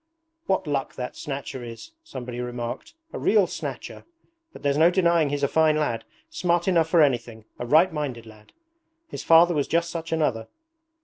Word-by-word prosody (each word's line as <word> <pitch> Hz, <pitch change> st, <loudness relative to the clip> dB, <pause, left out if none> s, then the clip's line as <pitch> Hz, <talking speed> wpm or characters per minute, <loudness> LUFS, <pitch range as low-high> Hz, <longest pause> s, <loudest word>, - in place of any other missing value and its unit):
'What 190 Hz, -1 st, +1 dB
luck 140 Hz, -3 st, -2 dB
that 125 Hz, 0 st, -5 dB
Snatcher 135 Hz, -3 st, -6 dB
has,' 115 Hz, -, -9 dB
somebody 125 Hz, -, -7 dB
remarked. 120 Hz, -, -6 dB, 0.2 s
'A -, -, -4 dB
real 210 Hz, -3 st, +4 dB
snatcher. -, -, -7 dB, 0.5 s
But -, -, -14 dB
there's 140 Hz, -1 st, +1 dB
no 165 Hz, +2 st, +6 dB
denying 170 Hz, -4 st, +2 dB
he's 145 Hz, 0 st, -3 dB
a -, -, +4 dB
fine 155 Hz, +1 st, +3 dB
lad, 145 Hz, -7 st, -1 dB, 0.3 s
smart 175 Hz, -, 0 dB
enough 170 Hz, -4 st, +3 dB
for 165 Hz, -2 st, +5 dB
anything, 120 Hz, -5 st, -1 dB
a 120 Hz, -, -4 dB
right 160 Hz, +6 st, +4 dB
minded 135 Hz, -7 st, -4 dB
lad! 110 Hz, -1 st, -16 dB, 0.6 s
His -, -, -7 dB
father 170 Hz, +1 st, +6 dB
was 145 Hz, -3 st, 0 dB
just 170 Hz, 0 st, 0 dB
such 165 Hz, -1 st, -6 dB
another. 130 Hz, -9 st, 0 dB
150 Hz, 175 wpm, -25 LUFS, 125-170 Hz, 0.6 s, no